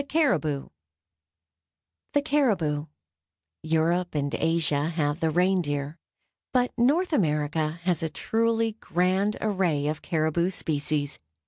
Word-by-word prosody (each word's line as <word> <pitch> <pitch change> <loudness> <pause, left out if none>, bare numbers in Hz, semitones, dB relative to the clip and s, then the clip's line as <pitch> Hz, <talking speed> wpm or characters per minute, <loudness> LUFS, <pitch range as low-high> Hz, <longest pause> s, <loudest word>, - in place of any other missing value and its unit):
The 270 - 0 1.6
Caribou 185 - +1 0.8
Europe 165 +2 0
and 145 -1 -1
Asia 160 -2 +1
have 150 -2 -1
the 160 - +1
reindeer, 160 -4 0 0.5
but 250 -1 +2
North 300 +9 +2
America 155 - 0
has 175 -3 +1
a 160 - -1
truly 225 +3 0
grand 185 +4 +1
array 185 -9 0
of 150 +1 -2
caribou 165 +1 0
species. 150 -4 -1
165 Hz, 100 wpm, -26 LUFS, 150-205 Hz, 1.6 s, but